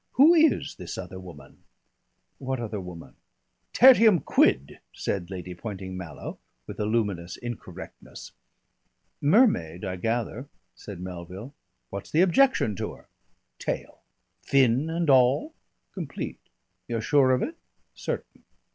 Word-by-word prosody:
"Who 300 +6 +7
is 320 -3 +3
this 90 -2 -7
other 90 0 -7
woman?" 80 -7 -13 0.8
"What 130 -1 -3
other 110 -3 -4
woman?" 90 -2 -10 0.5
"Tertium 230 -7 +7
quid," 70 +2 +2
said 90 -3 -3
Lady 90 -1 -6
Poynting 95 -1 -7
Mallow, 85 -6 -7 0.3
with - - -9
a 105 - 0
luminous 100 -6 -1
incorrectness. 120 -2 -9 0.9
"Mermaid, 140 - +3
I 95 -1 -3
gather," 115 +6 -2 0.2
said 100 -4 -10
Melville. 90 - -8 0.4
"What's 100 0 -6
the 160 - +3
objection 190 - +3
to - - -4
her?" - - -21 0.5
"Tail." - - -4 0.4
"Fin 135 +2 +3
and 170 0 -1
all?" 135 - +4 0.4
"Complete." - - -6 0.5
"You're 115 -1 -2
sure 140 +2 +4
of 130 -1 +2
it?" 330 - -4 0.4
"Certain." - - -6
115 Hz, 120 wpm, -26 LUFS, 90-145 Hz, 0.9 s, Who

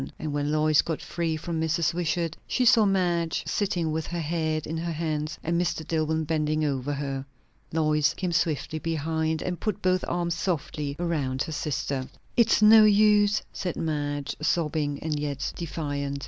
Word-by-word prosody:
And 155 -2 -4
when 145 0 -1
Lois 155 0 +4
got 160 -2 -3
free 165 0 -2
from 165 0 -3
Mrs. 160 +1 +1
Wishart, 170 -1 -1
she 250 - +1
saw 230 -3 +6
Madge 175 -4 +1
sitting 175 -6 -1
with 160 0 -2
her 175 - -3
head 155 -1 -1
in 160 - -4
her 170 +1 -2
hands, 155 -1 -2
and 170 +1 +1
Mr. 165 -3 -2
Dillwyn 160 0 0
bending 155 0 0
over 140 -1 -1
her. 140 -1 -3 0.5
Lois 150 -2 +2
came 185 -2 -2
swiftly 160 -2 0
behind 160 0 -1
and 180 -1 -3
put 215 -4 -2
both 185 0 +1
arms 170 -1 -1
softly 150 -4 -2
around 145 -6 -1
her - - -6
sister. 140 -3 -2 0.3
"It's 230 -2 +4
no 215 +1 +9
use!" 210 0 +4
said 180 -3 -3
Madge, 145 -2 -2
sobbing 155 -2 0
and 155 -2 -1
yet 140 -2 -3
defiant. 145 -3 -3
160 Hz, 165 wpm, -26 LUFS, 150-170 Hz, 0.5 s, no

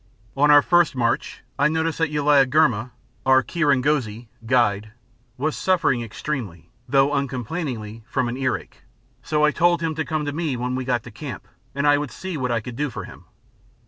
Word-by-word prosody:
On 145 +2 +3
our 145 -1 +7
first 175 -5 +3
march 115 -2 -1 0.2
I 140 - +5
noticed 160 0 -1
that 165 -2 +1
Uliagurma, 140 -4 +3 0.3
our 130 0 +4
kirongozi 130 -8 0 0.2
(guide), 110 -4 +1 0.4
was 150 +4 -1
suffering 180 -10 +1
extremely, 110 - -6 0.2
though 140 +1 +3
uncomplainingly, 125 -5 -4
from 125 0 -1
earache, 130 -1 -3 0.4
so 150 -1 +1
I 150 - +3
told 175 +1 +2
him 160 -1 0
to 160 - -2
come 155 0 -2
to 145 - -3
me 155 -5 -2
when 125 +1 -2
we 130 0 -3
got 125 -3 0
to 120 - -11
camp 140 +4 -8 0.3
and 140 +1 -1
I 145 0 +5
would 145 -2 -4
see 185 +4 -6
what 130 -4 -2
I 115 -1 0
could 120 +1 -8
do 150 +3 -1
for 110 -5 -7
him. - - -13
135 Hz, 175 wpm, -23 LUFS, 120-150 Hz, 0.4 s, our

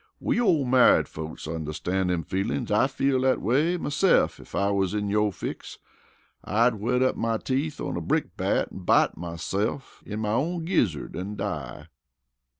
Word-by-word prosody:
We 240 - 0
ole 170 - +3
married 125 0 +5
folks 80 0 -7
onderstan's 80 +4 -2
dem 90 -2 0
feelin's. 105 - -2
I'd 105 +6 +3
feel 135 -1 +1
dat 130 0 +2
way 150 - +1
mese'f 165 +4 +2
ef - - -11
I 100 +1 +1
wus 100 0 0
in 105 -1 -1
yo' 105 0 +2
fix. 95 - -7 0.7
I'd 115 +4 +2
whet 120 +4 0
up 130 - +2
my 115 -1 0
teeth 140 +6 -2
on - - -3
a - - -3
brick - - -1
bat - - 0
an' - - -8
bite 90 - +3
myse'f 90 - -4
in 105 +1 -5
my 105 -1 -1
own 160 +8 -1
gizzard 120 - 0
an' 100 +4 -5
die." 75 -13 -5
110 Hz, 170 wpm, -26 LUFS, 95-135 Hz, 0.7 s, married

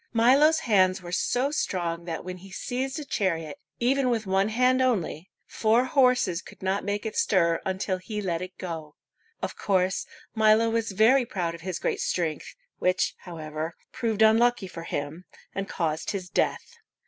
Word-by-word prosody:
Milo's 280 +8 +5
hands 190 - +3
were 175 - -7
so 250 +9 +1
strong 170 - -2
that 165 -1 -5
when 185 0 -5
he 195 +2 -13
seized 260 - -3
a 300 - -5
chariot, 165 - -2 0.2
even 255 +2 +2
with 225 -3 0
one 195 +2 +2
hand 255 +3 +3
only, 195 -9 0 0.2
four 230 +3 +2
horses 250 -9 +3
could - - -14
not 190 +1 0
make 205 +1 -2
it 220 - -4
stir 170 -4 +2
until 190 0 -1
he 210 +3 -5
let 175 -4 -2
it 185 0 -7
go. 160 -4 -6 0.5
Of - - -3
course, 190 -1 0 0.3
Milo 220 +1 +4
was 230 -1 0
very 240 +7 +5
proud 180 -8 -2
of 170 - -10
his 185 0 -3
great - - -1
strength, 165 -4 -2 0.2
which, 185 +1 +1
however, 160 -1 -6 0.2
proved 225 -4 0
unlucky 225 0 +4
for 165 -2 -8
him, 145 +5 -4 0.3
and 195 0 -4
caused 160 -2 -2
his 185 -3 -4
death. 480 - -1
195 Hz, 170 wpm, -26 LUFS, 175-235 Hz, 0.5 s, Milo's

